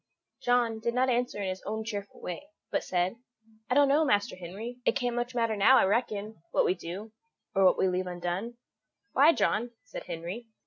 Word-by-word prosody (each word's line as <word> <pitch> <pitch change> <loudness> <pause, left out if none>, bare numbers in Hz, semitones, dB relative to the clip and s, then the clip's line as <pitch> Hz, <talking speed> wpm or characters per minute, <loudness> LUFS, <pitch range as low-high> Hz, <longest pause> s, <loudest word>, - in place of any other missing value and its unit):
John 240 -2 +2
did 235 +2 -2
not 255 +1 +3
answer 245 -3 0
in 190 - -1
his 185 0 -4
own 220 +1 -3
cheerful 205 -3 -6
way, 180 +12 -6 0.2
but - - 0
said: 180 +4 0 0.5
"I 250 - +2
don't 285 0 +6
know, 290 +3 +4
Master 205 -8 +1
Henry; 200 +8 -7
it - - +2
can't 245 -3 -1
much 240 +1 -2
matter 230 -2 +1
now, 210 +6 +6
I - - +5
reckon, 210 -2 -1
what - - +2
we - - +3
do, 185 +5 -7 0.4
or 195 -1 +4
what 185 - +5
we - - +3
leave 185 0 -1
undone." 180 +6 -3 0.5
"Why, 290 +5 +6
John?" 240 -5 0
said - - -8
Henry. 180 +8 -6
220 Hz, 195 wpm, -29 LUFS, 185-245 Hz, 0.5 s, don't